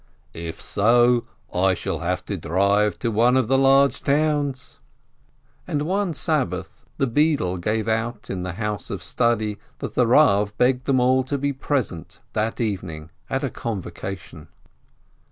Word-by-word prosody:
"If 85 0 -6
so, 120 +3 +3 0.3
I 95 +1 +3
shall - - -3
have - - -2
to - - -3
drive 100 +5 +1
to 115 - -2
one 120 +4 +4
of 130 -4 +2
the 135 +2 +3
large 135 +1 +4
towns 145 -2 0 0.4
!" - - -38
And 145 0 -1
one 185 0 -1
Sabbath 95 - -1
the 140 - +2
beadle 135 - +1
gave 110 +5 -1
out 110 0 -2
in 95 -2 -3
the 90 -1 -4
house 105 -1 -4
of - - -5
study 110 -4 0 0.2
that - - -6
the 125 - +2
Rav 105 -6 +4
begged 125 +1 +2
them 135 -2 +2
all 130 +1 +3
to 140 +2 -2
be 140 +1 -1
present 130 - -3
that 110 +1 -1
evening 90 -8 -3 0.2
at 135 +2 -1
a 135 - -1
convocation. 95 - -6
115 Hz, 155 wpm, -23 LUFS, 100-135 Hz, 0.4 s, one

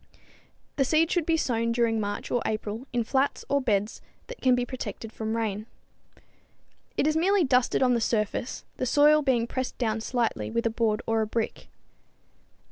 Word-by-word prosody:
The 275 - +4
seed 315 +4 +2
should 345 -3 0
be 330 -1 +3
sown 230 -6 0
during 230 -1 +1
March 205 -1 -4
or 245 - +1
April 215 +3 -3
in 240 -1 0
flats 270 +4 0
or 280 0 +2
beds 210 -3 0 0.2
that - - -10
can 255 -1 +4
be 245 0 0
protected 245 -3 -6
from 220 +1 -3
rain. 215 -1 -2 1.3
It - - +2
is 310 0 +2
merely 380 +4 +3
dusted 255 -2 +2
on 250 -1 +4
the 235 - +1
surface, 220 +2 -1
the 255 - -1
soil 295 +4 +5
being 255 -5 +2
pressed 255 +1 -4
down 220 -2 -1
slightly 240 0 -1
with 230 +1 -1
a 230 - +2
board 220 -2 0
or 225 0 +1
a 215 - -1
brick. 225 +1 -3
235 Hz, 180 wpm, -27 LUFS, 225-270 Hz, 1.3 s, soil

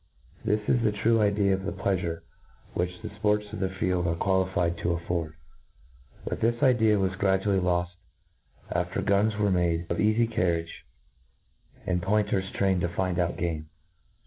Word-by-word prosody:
This 105 +1 +1
is 125 - +3
the 110 -2 +2
true 110 +2 +2
idea 100 -1 +2
of 95 - -1
the 95 - -2
pleafure 90 -4 -2 0.5
which 90 0 -3
'the - - -4
fports 105 0 +2
of - - -5
the 95 - 0
field 90 -2 -1
are 85 - 0
quali? 95 +1 +1
fied 85 -2 0
to 85 0 0
aflford; 85 -2 -3 0.9
but - - -3
this 120 +1 +1
idea 110 -5 +4
was 95 -1 0
gradually 95 0 +2
loft 90 -1 0 0.8
after 90 +1 -1
guns 100 +1 +2
were 105 -1 +2
made 85 -2 +1
of 85 - 0
eafy 110 +2 +3
carriage^ 85 -7 0 1.1
and 90 -1 0
point 105 +3 +1
ers 95 0 0
trained 95 -2 +1
to 85 - 0
find 90 0 -1
out 85 -1 0
game. 80 -3 -3
95 Hz, 170 wpm, -27 LUFS, 85-105 Hz, 1.1 s, idea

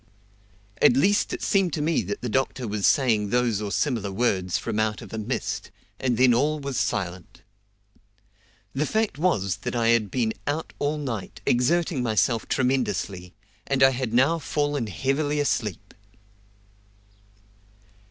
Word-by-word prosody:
At 120 - +6
least 205 +9 +3
it - - -4
seemed 190 -5 +2
to 150 - -1
me 160 +1 +2
that 100 +2 -5
the 125 - -3
doctor 130 0 -1
was 105 -1 +1
saying 110 -7 +2
those 120 -3 +1
or 105 -1 -4
similar 115 -8 -1
words 95 -4 0
from 110 -2 -3
out 110 0 -1
of - - -12
a 110 - -3
mist, 105 - -3 0.3
and 125 -3 0
then 125 -1 +5
all 150 +5 +1
was 140 -2 -4
silent. 90 -1 -3 1.3
The 145 +3 0
fact 220 -8 -1
was 105 - +1
that 125 0 -5
I 115 -1 +2
had 115 -3 +3
been 115 -2 0
out 150 +3 -2
all 145 +2 0
night, 125 -9 -5
exerting 155 +4 +2
myself 115 0 +1
tremendously, 105 -8 -1 0.3
and 135 -1 +2
I 135 - +7
had 125 -3 -3
now 135 +8 +3
fallen 145 -5 -1
heavily 140 - -1
asleep. 105 - -2
125 Hz, 150 wpm, -25 LUFS, 105-145 Hz, 1.3 s, I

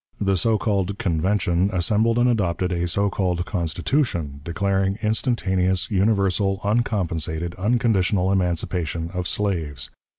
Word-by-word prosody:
The 100 -1 +1
so 110 +5 +2
called 100 -3 -1
Convention 90 +1 +1
assembled 105 +5 +1
and 120 +1 +4
adopted 95 -6 0
a 85 0 -1
so 100 +3 0
called 90 -3 -1
Constitution, 85 - -1
declaring 95 +3 0
"instantaneous, 95 -5 0
universal, 100 -1 +1
uncompensated, 85 -7 -1
unconditional 100 -3 +1
emancipation 85 -3 -1
of 90 -1 -2
slaves." 85 -10 -2
95 Hz, 110 wpm, -23 LUFS, 85-105 Hz, -, and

